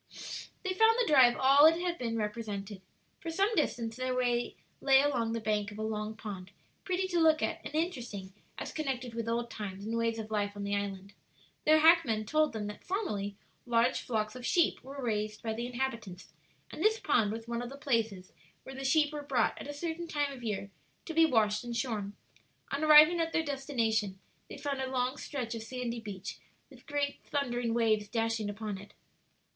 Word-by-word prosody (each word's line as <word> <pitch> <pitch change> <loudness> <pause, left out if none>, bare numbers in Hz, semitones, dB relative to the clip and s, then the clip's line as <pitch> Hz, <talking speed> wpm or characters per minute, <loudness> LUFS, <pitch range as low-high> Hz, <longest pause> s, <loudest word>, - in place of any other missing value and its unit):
They 375 -1 -1
found 445 +4 +5
the 485 - +3
drive 260 - +6
all 275 +3 +7
it 330 +1 +3
had 350 -1 -2
been 230 -2 -2
represented. 210 -2 -4 0.4
For 335 - -6
some 390 +7 +1
distance 235 - 0
their 255 0 -1
way 245 -1 0 0.3
lay 270 -1 +6
along 250 -5 +1
the 230 - -1
bank 210 -1 -1
of 205 - -10
a 215 - -3
long 215 0 -3
pond, 195 -4 -7 0.3
pretty 375 0 -1
to 350 -2 +1
look 315 -1 +4
at 335 0 -1
and 295 - -7
interesting 240 - -3 0.2
as - - -5
connected 260 -5 -3
with 230 0 -3
old 235 0 -1
times 200 -2 -6
and 225 +1 -2
ways 230 0 0
of 220 -1 -6
life 205 -1 0
on 205 - -5
the 200 0 -1
island. 200 -1 -4 0.5
Their 310 0 +6
hackmen 310 -10 +5
told 310 +6 +2
them 220 -2 -4
that 210 0 -7
formerly 210 - -2 0.3
large 240 +2 +2
flocks 215 -2 -2
of 250 - -8
sheep 340 +7 +2
were 275 +2 -8
raised 215 -2 -2
by 225 -1 -1
the 235 +2 -3
inhabitants, 235 -7 -4 0.4
and - - -7
this 440 +1 +4
pond 220 -8 +2
was 225 +1 -6
one 235 0 -2
of 245 - -5
the 275 - -9
places 225 -9 -1 0.3
where 265 - -9
the 270 0 -6
sheep 295 +2 +3
were 295 - -4
brought 285 - +1
at - - -7
a - - -4
certain 330 +3 -4
time 290 -3 -1
of 255 - -10
year 200 -3 -3 0.3
to 325 - -5
be 325 0 +6
washed 215 -5 +2
and 240 -1 -4
shorn. 210 -4 -2 0.6
On 300 - -1
arriving 310 +3 +8
at 330 0 0
their 325 - +2
destination, 230 -8 -1 0.3
they - - -8
found 280 -2 -3
a 260 - -2
long 255 +1 0
stretch 250 -5 -4
of 230 - -5
sandy 240 0 -4
beach, 205 -4 -7 0.3
with - - -17
great 290 -2 -1
thundering 245 -5 -1
waves 215 -3 +2
dashing 225 -1 -1
upon 205 -1 -5
it. 200 - -14
240 Hz, 200 wpm, -31 LUFS, 215-290 Hz, 0.6 s, arriving